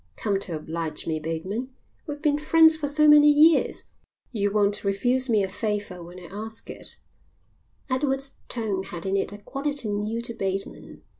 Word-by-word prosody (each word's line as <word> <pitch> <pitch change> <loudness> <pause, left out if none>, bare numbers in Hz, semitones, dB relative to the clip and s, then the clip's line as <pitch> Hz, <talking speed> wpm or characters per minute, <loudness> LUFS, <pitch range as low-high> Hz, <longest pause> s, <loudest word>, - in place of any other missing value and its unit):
"Come 200 -2 -1
to 180 -4 -3
oblige 160 +1 -4
me, 160 -1 -1
Bateman. 190 +11 -4 0.3
We've 295 0 -6
been 295 -1 +2
friends 320 +1 +6
for 310 -2 -3
so 305 +2 +3
many 295 0 +8
years, 305 +2 +4 0.5
you 205 -4 0
won't 205 0 +1
refuse 245 +6 +1
me 215 -3 +3
a - - 0
favour 205 -2 -3
when 175 +2 -11
I - - -13
ask 220 +2 -7
it." - - -4 0.9
Edward's 270 0 -1
tone 215 -5 -2
had 175 -2 -7
in 195 0 0
it 195 - 0
a 205 - -8
quality 275 +3 -3
new 210 +2 -2
to 235 0 -5
Bateman. 195 -2 -5
215 Hz, 170 wpm, -25 LUFS, 195-275 Hz, 0.9 s, many